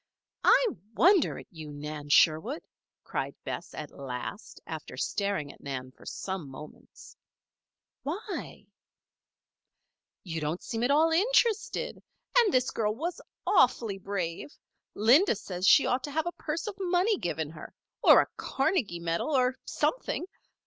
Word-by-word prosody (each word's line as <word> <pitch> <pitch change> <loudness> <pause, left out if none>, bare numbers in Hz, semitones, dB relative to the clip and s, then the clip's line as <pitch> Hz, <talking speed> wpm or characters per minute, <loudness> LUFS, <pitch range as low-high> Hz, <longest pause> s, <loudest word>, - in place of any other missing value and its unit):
"I - - +6 0.3
wonder 370 - +4
at - - -9
you, 155 -4 -9
Nan 145 0 -7
Sherwood!" 160 - +4 0.4
cried - - -3
Bess, - - -6
at 150 - -6
last, 135 - -7
after 160 -2 -7
staring 200 -8 -1
at - - -21
Nan 130 -2 -5
for - - -17
some 190 -7 -5
moments. 150 +3 -12 0.9
"Why?" 375 +8 -5 1.6
"You 165 -3 -4
don't 155 +4 -2
seem 225 -1 -3
at 245 - +2
all 315 +3 +4
interested. 435 +4 +1 0.4
And 450 -5 +4
this 255 -3 +2
girl 215 -1 0
was 330 +7 -4 0.2
awfully 230 - +3
brave. 190 - -4 0.4
Linda 240 - +5
says 185 -2 -3
she - - +7
ought 250 +1 +1
to 290 - -7
have 315 +2 0
a 345 - -1
purse 325 +1 -4
of 425 - -3
money 370 +3 +2
given 160 -3 -2
her 160 - -10 0.3
or - - +8
a - - -3
Carnegie 270 - 0
medal 170 - -1
or 260 -3 +3
something. - - -1
215 Hz, 140 wpm, -29 LUFS, -, 1.6 s, or